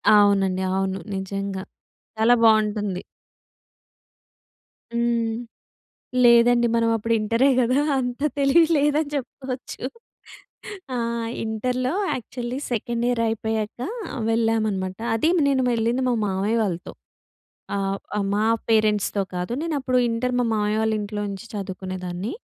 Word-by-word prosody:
అవునండి. 195 -2 +4
అవును. 190 0 -1 0.2
నిజంగా. 195 0 -4 0.6
చాలా 235 +2 +5
బావుంటుంది. 210 -3 +3 1.9
హ్మ్. 235 -1 +1 0.9
లేదండి 235 0 +6
మనం 230 0 +2
అప్పుడు 230 +1 0
ఇంటరే 230 +5 +2
గదా! 255 +3 +3 0.2
అంత 245 +2 -3 0.2
తెలివి 285 +4 +5
లేదని 295 +1 +2
చెప్పచ్చు. 260 -1 -5 1.1
ఆ! - - -1 0.5
ఇంటర్‍లో 250 +5 -1 0.2
యాక్చువల్లీ 245 +2 -5
సెకండ్ 235 +1 -1
ఇయర్ 240 -2 +1
అయిపోయాక 220 0 -2 0.5
వెళ్ళామనమాట. 220 -5 0 0.2
అది 310 +9 +2 0.2
నేను 265 -2 +2
వెళ్ళింది 235 +3 +1
మా - - +2
మావయ్య 200 +4 0
వాళ్ళతో. 180 -3 -4 0.8
ఆహ్, 195 0 -1 0.4
మా 215 +1 +1 0.2
పేరెంట్స్‌తో 210 -2 +2
కాదు. 180 +6 -3
నేను 330 -3 -2
అప్పుడు 255 -1 0
ఇంటర్ 250 +2 -1
మా 245 - +2
మావయ్య 210 0 +1
వాళ్ళింట్లో 210 -1 -1
నుంచి 200 +4 -7
చదువుకునేదాన్ని. 185 - -5
225 Hz, 105 wpm, -23 LUFS, 200-245 Hz, 1.9 s, లేదండి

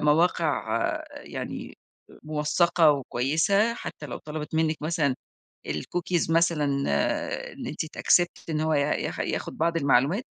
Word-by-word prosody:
مواقع 155 +1 +2 0.5
يعني - - -7 0.5
موثّقة 155 +2 +3
وكويسة، 160 - +1
حتى 150 -9 -7
لو - - -6
طلبت 155 +1 -6
منِّك 160 0 +2
مثلًا 150 -4 +1 0.5
الcookies 170 - -1
مثلًا 165 -2 +3 0.9
إن - - -8
أنتِ 155 - -3
تaccept 175 +2 +2
إن 155 -1 0
هو 155 0 +1
ي 145 - +3
ياخ 140 +1 -1
ياخد - - -3
بعض 165 +1 +1
المعلومات، 145 - +3
155 Hz, 120 wpm, -26 LUFS, 150-170 Hz, 0.9 s, موثّقة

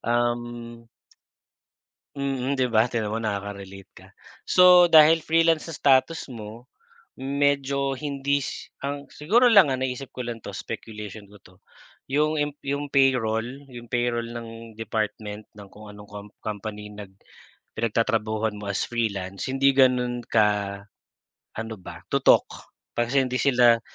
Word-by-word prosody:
um 120 0 -2 1.3
Mm 135 -1 -2
di 130 -2 0
ba? 110 0 +4
Tignan 115 -3 -2
mo 110 - -2
nakaka-relate 100 -2 -5
ka. 95 - -15 0.4
So 180 -1 +7
dahil 160 0 +6
Freelance 165 0 +3
sa 165 - -7
status 140 +2 +2
mo, 115 +2 -10 0.5
medyo 140 0 0
hindi 140 0 -1
sy 130 - -7
ang 140 +1 -4
siguro 210 +12 +2
lang 195 -8 +7
ang 130 0 -1
naisip 130 +1 -4
ko 125 - -6
lang 115 -1 -5
'to 100 -2 -8
speculation 105 -2 -8
ko 105 - -16
'to. 90 - -18 0.5
Yung 150 +2 +1 0.2
yung 140 +1 -2
payroll, 125 -5 +2 0.2
yung 120 -2 -12
payroll 120 -1 0
ng 115 -1 -9
department 110 -1 -4
ng 100 -2 -13
kung 105 0 -13
anong 105 0 -13
com 105 0 -9
company 105 0 -6
na 105 - -7 0.7
pinagtatrabahuhan 110 -1 0
mo 105 - -8
as 100 - -1
Freelance 100 -5 -3
hindi 135 +1 +3
ganon 125 -2 +2
ka 105 -3 +1 0.8
ano 110 0 -5
ba? - - -11
Tutok. - - +2 0.2
Pag 120 0 -1
kasi 135 0 +2
hindi 125 0 -2
sila 120 -4 +4
120 Hz, 140 wpm, -25 LUFS, 110-135 Hz, 1.3 s, So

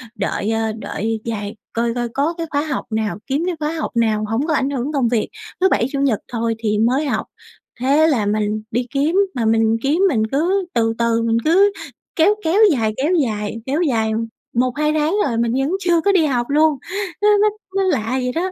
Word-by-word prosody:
đợi, 205 0 -2
à, 225 0 0
đợi 225 +1 -3
dài 210 -2 -4 0.2
coi 230 0 0
coi 240 -1 -2
có 285 +7 0
cái 335 -1 -3
khóa 285 -1 0
học 295 -3 -3
nào, 215 -4 -1
kiếm 285 +4 0
cái 365 - -1
khóa 305 +1 -2
học 315 - -3
nào 220 -2 +1
hổng 235 +7 -1
có 315 - +1
ảnh 270 -1 +1
hưởng 275 +1 -2
công 270 -4 +2
việc, 230 -3 0 0.3
thứ 380 - +5
Bảy, 235 - +2
Chủ 280 - -2
nhật 265 -7 +1
thôi 230 -1 -1
thì 215 -2 0
mới 255 +7 +2
học." 280 - -1 0.5
Thế 280 +5 +3
là 250 -10 +1
mình 210 +1 0
đi 245 +2 -1
kiếm 290 +5 +1 0.2
mà 235 -3 -1
mình 225 0 +3
kiếm 295 +6 +1
mình 220 -5 +1
cứ 360 +7 +1
từ 225 -1 +1
từ, 230 -1 +1
mình 230 0 +1
cứ 390 +6 +5 0.4
kéo 375 +6 +4
kéo 340 +6 +2
dài, 225 -6 0
kéo 295 +7 +1
dài, 210 -2 -3
kéo 285 +6 0
dài 225 -8 +1 0.4
1-2 260 +5 +1
tháng 310 +4 +1
rồi 235 - -2
mình 230 0 +1
vẫn 270 +4 0
chưa 345 -3 +2
có 400 - +3
đi 365 -5 +3
học 245 -4 -1
luôn. 300 0 +3 0.4
Nó 415 - +3
nó 425 - +5 0.3
nó 390 - +2
lạ 265 - 0
vậy 255 -1 -1
đó, 365 +3 -1
255 Hz, 215 wpm, -19 LUFS, 225-310 Hz, 0.5 s, thứ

